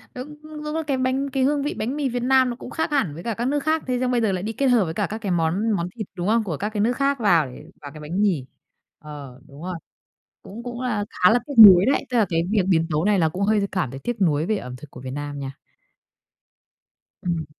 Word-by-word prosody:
Đúng, 275 +4 -7
đúng 305 0 -6
là 320 - -1
cái 275 -2 0
bánh 260 +2 0
cái 265 -1 0
hương 285 +1 +1
vị 290 - -2
bánh 240 +6 -3
mì 290 -3 -1
Việt 245 0 -3
Nam 260 0 +4
nó 240 - -4
cũng 255 - -10
khác 320 - -2
hẳn 270 - +1
với 165 +3 -9
cả 230 - -2
các 235 +3 -2
nước 290 +2 +1
khác, 315 0 +1
thế 250 -1 0
xong 255 0 0
bây 240 -2 +1
giờ 220 - +1
lại 185 -1 -3
đi 220 +2 -3
kết 275 - 0
hợp 240 -7 +4
với 160 - -4
cả - - -1
các 215 - -4
cái 200 - -2
món 175 +6 +1
món 175 -4 -1
thịt, 215 -5 -5
đúng 175 -1 -3
không, 225 +1 +3
của 170 -8 -4
các 210 - -2
cái 210 -1 -2
nước 235 +4 +2
khác 280 -1 +1
vào 170 - +3 0.3
vào 145 - -9
cái 155 - -10
bánh 170 +6 -3
mì. 180 -11 +1 0.5
Ờ, 140 -4 -10
đúng 140 +3 -13
rồi, 180 0 -4 0.7
cũng 220 +4 -9
cũng 240 0 -6
là 225 -5 -1
khá 180 - +3
là 235 - +4
tiếc 285 - -6
nuối 185 0 +7
đấy, 275 - +1
tức 245 - 0
là 215 - +4
cái 165 -1 +1
việc 210 -2 +3
biến 165 -3 +3
tấu 155 +1 0
này 205 -1 +3
là 160 -3 +3
cũng 180 +5 -5
hơi 205 0 +2
cảm 180 -9 -1
thấy 135 - -8
tiếc 240 -3 -4
nuối 155 -3 +2
về 215 - +1
ẩm 125 -9 -7
thực 140 +3 -13
của 125 - -11
Việt 130 0 -7
Nam 145 +1 -5
nha. 135 0 -7 1.7
Ừm. 170 -3 -1
210 Hz, 275 wpm, -23 LUFS, 165-255 Hz, 1.7 s, nuối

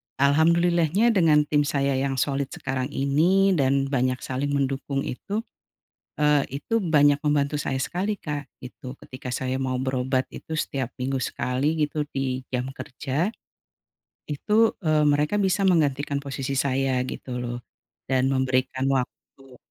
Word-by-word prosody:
alhamdulillahnya 170 - +3
dengan 160 -7 +4
tim 145 -1 +1
saya 140 -1 +1
yang 135 0 -1
solid 135 +1 0
sekarang 130 0 -2
ini 160 +8 +2
dan 140 -4 +1
banyak 130 -1 +1
saling 135 +2 -2
mendukung 135 0 -1
itu, 205 - -4 0.8
eee, 150 -1 +4 0.2
itu 225 +8 -1
banyak 145 -3 +4
membantu 145 -1 +1
saya 135 -2 -2
sekali 195 +9 -2
Kak, 145 -3 -5
gitu. 125 +1 -9
Ketika 130 -1 -8
saya 130 +1 -2
mau 130 -1 -1
berobat 130 0 0
itu 160 -1 -5
setiap 130 -3 -2
minggu 130 0 -1
sekali 140 +8 -1
gitu 150 0 -2
di 130 -1 -2
jam 125 0 -1
kerja 145 - -2 1.0
itu, 210 +10 +2
eee, 155 -1 +3
mereka 150 +8 +2
bisa 195 0 +1
menggantikan 145 -5 +2
posisi 140 -1 -4
saya 135 -1 +1
gitu 125 -1 -5
loh, 120 0 -4 0.5
dan 130 0 +3
memberikan 130 0 0
waktu. 130 0 -5
140 Hz, 135 wpm, -25 LUFS, 130-155 Hz, 1.0 s, dengan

